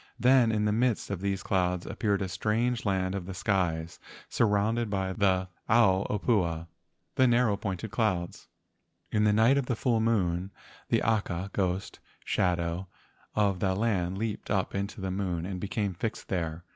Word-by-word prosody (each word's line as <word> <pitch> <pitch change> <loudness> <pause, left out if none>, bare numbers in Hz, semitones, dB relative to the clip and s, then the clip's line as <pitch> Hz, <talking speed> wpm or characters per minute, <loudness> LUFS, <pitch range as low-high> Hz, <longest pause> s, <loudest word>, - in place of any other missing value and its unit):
Then 125 -2 +5
in 105 -1 +1
the 105 - +2
midst 115 -1 0
of 95 -3 -3
these 100 -1 -1
clouds 90 -2 0
appeared 100 -2 -1
a - - -2
strange 110 +6 -1
land 95 -2 0
of 95 -2 -4
the 95 - -6
skies 90 -4 -1 0.3
sur¬ 115 - +3
rounded 110 +3 +1
by 95 -2 -1
the 95 -2 +2 0.2
ao 100 -4 +4
opua 90 -7 0 0.5
(the 130 - +4
narrow 120 -3 +3
pointed 100 +1 -4
clouds). 95 -7 -1 0.6
In 105 0 +2
the 105 - +5
night 115 +6 +4
of 130 - -3
the 125 - 0
full 115 0 +1
moon, 95 -5 +1 0.4
the - - +2
aka 100 -4 -1
(ghost) 95 0 -2 0.3
shadow 85 0 0 0.5
of 100 -3 +2
that 95 0 0
land 95 -5 0
leaped 110 0 -4
up 95 -2 0
into 100 +1 -3
the 95 0 -2
moon 90 -3 -2
and 95 -1 -4
became 100 0 -2
fixed 110 +5 -4
there. 85 -2 -2
100 Hz, 170 wpm, -29 LUFS, 95-110 Hz, 0.6 s, Then